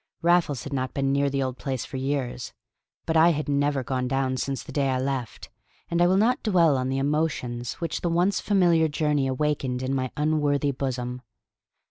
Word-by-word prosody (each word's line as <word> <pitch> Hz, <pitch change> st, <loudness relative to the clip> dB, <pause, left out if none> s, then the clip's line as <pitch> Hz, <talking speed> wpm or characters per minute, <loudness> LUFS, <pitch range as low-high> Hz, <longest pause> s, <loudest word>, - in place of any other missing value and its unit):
Raffles 170 Hz, -7 st, +2 dB
had 140 Hz, -, -6 dB
not 130 Hz, -1 st, -2 dB
been 135 Hz, -1 st, +1 dB
near 140 Hz, 0 st, +2 dB
the 135 Hz, 0 st, -1 dB
old 130 Hz, -1 st, -4 dB
place 130 Hz, -4 st, -3 dB
for 135 Hz, -, -6 dB
years; 130 Hz, -5 st, -3 dB, 0.5 s
but 160 Hz, -, -1 dB
I 160 Hz, +1 st, +6 dB
had 150 Hz, 0 st, -3 dB
never 145 Hz, -1 st, +1 dB
gone 125 Hz, 0 st, -2 dB
down 135 Hz, 0 st, 0 dB
since 135 Hz, +1 st, -3 dB
the -, -, -10 dB
day 140 Hz, -2 st, 0 dB
I 130 Hz, -, +1 dB
left; 130 Hz, -3 st, -4 dB, 0.4 s
and 170 Hz, 0 st, +1 dB
I 175 Hz, -, +5 dB
will 185 Hz, +1 st, +3 dB
not 235 Hz, +5 st, +2 dB
dwell 170 Hz, -, +3 dB
on 130 Hz, 0 st, -1 dB
the 135 Hz, -, -1 dB
emotions 135 Hz, -4 st, -1 dB
which 165 Hz, -2 st, -4 dB
the 175 Hz, -, 0 dB
once 180 Hz, +3 st, +2 dB
familiar 175 Hz, -5 st, +3 dB
journey 150 Hz, -2 st, 0 dB
awakened 130 Hz, -2 st, -1 dB
in 130 Hz, +1 st, -1 dB
my 130 Hz, -1 st, -1 dB
unworthy 150 Hz, -2 st, +1 dB
bosom. 125 Hz, -2 st, -4 dB
140 Hz, 195 wpm, -25 LUFS, 130-155 Hz, 0.5 s, I